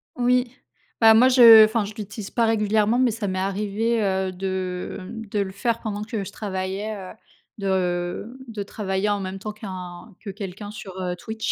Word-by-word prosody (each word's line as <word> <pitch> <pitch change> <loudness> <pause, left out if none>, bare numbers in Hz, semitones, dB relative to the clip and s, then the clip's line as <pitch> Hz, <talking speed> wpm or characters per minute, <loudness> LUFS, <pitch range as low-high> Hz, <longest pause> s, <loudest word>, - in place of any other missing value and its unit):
Oui. 250 0 +1 0.5
Bah, 225 -1 +8
moi 245 +4 +6
je 230 -4 +9
enfin, 220 -1 0
je 210 - -8
l'utilise 210 -1 -7
pas 235 -1 +1
régulièrement, 215 +1 +2
mais 250 -3 +3
ça 215 -2 -4
m'est 185 0 -2
arrivé, 210 +4 -1
heu, 190 -1 0
de, 185 -1 -4
mmh, 225 +4 -8
de 210 - 0
le 195 -1 -1
faire 230 +4 -1
pendant 210 -2 -4
que 215 -2 -4
je 195 - -8
travaillais. 195 +1 -4
Heu, 190 -3 -8 0.4
de 190 +3 -2
de 215 -3 -5
travailler 200 0 -2
en 205 - 0
même 190 0 -5
temps 215 +2 -5
qu'un 185 -1 -9
que 205 - -6
quelqu'un 205 +1 -7
sur, 210 -2 -9
heu, 180 -1 -2
Twitch. 220 +4 -4
205 Hz, 190 wpm, -23 LUFS, 190-225 Hz, 0.5 s, je